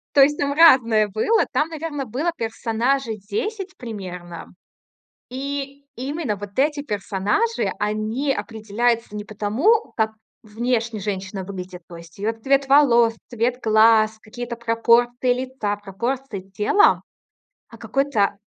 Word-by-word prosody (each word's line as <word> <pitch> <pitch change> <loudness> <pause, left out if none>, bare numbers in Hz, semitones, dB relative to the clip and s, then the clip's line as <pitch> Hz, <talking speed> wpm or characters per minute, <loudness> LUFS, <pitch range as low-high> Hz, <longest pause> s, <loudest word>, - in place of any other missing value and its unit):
То 280 - +7
есть 295 +2 +5
там 285 0 0
разное 250 -9 +6
было. 220 - +1
Там, 310 - +1
наверно, 310 -3 -4
было 270 +9 -1
персонажей 230 +2 -1
10 370 - -4
примерно. 180 -7 -8 0.8
И 280 +2 -5
именно 270 -2 -3
вот 205 0 -8
эти 290 +2 +2
персонажи, 210 - -1
они 215 +7 -1
определяются 225 0 -1
не 210 - -4
потому, 220 - +1
как 220 -1 +1 0.3
внешне 230 0 -2
женщина 195 -1 -4
выглядит. 185 -2 -8
То 175 - -11
есть 170 -1 -13
её 210 +3 -1
цвет 270 +4 +1
волос, 240 -5 +5
цвет 240 +2 -1
глаз, 220 0 +4
какие-то 235 +2 -7
пропорции 235 +2 +2
лица, 250 -5 -3
пропорции 210 +3 -4
тела, 210 - +4 0.7
а - - -14
какой-то 265 -8 0
230 Hz, 125 wpm, -22 LUFS, 210-275 Hz, 0.8 s, То